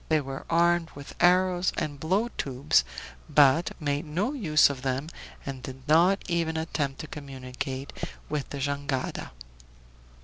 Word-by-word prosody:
They 155 -1 +4
were 135 -1 -6
armed 170 0 +3
with 140 0 -9
arrows 180 0 +4
and 145 -2 -3
blow 190 +10 +1
tubes, 135 +2 +2 0.5
but 145 +4 +4
made 145 -1 -1
no 180 - -1
use 160 - +4
of 140 -3 -5
them, 135 +3 -2 0.4
and 135 -2 -5
did 130 +1 -9
not 175 +6 +4
even 165 -2 0
attempt 150 -4 -2
to 155 - -7
communicate 135 -1 -6 0.3
with 150 -2 -3
the 140 - -5
jangada. 140 -1 -2
150 Hz, 140 wpm, -27 LUFS, 135-170 Hz, 0.5 s, They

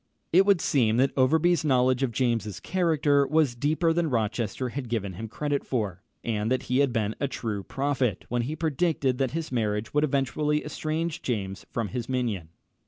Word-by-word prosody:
It 190 +3 +6
would 200 -4 +4
seem 115 -5 +2
that 135 +2 +3
Overbury's 160 +7 +3
knowledge 130 -2 +3
of 135 -3 +1
James's 115 -4 -1
character 155 -6 +2
was 150 -3 +2
deeper 155 +6 +1
than 170 -1 +1
Rochester 115 +1 -1
had 130 -1 -5
given 100 -5 -2
him 110 +6 -6
credit 145 +5 -2
for, 105 -8 -2 0.2
and 110 0 -1
that 130 - +1
he 125 +1 0
had 140 -2 +3
been 110 -3 0
a 140 - 0
true 110 -6 -3
prophet 135 -2 -1
when 120 0 0
he 140 +6 -3
predicted 155 -4 0
that 135 -2 +1
his 165 -4 -4
marriage 110 -2 -1
would 150 0 +3
eventually 150 +2 0
estrange 155 +1 -3
James 100 -6 -3
from 115 -4 -2
his 120 -1 -4
minion. 115 -10 -2
130 Hz, 180 wpm, -27 LUFS, 115-150 Hz, 0.2 s, It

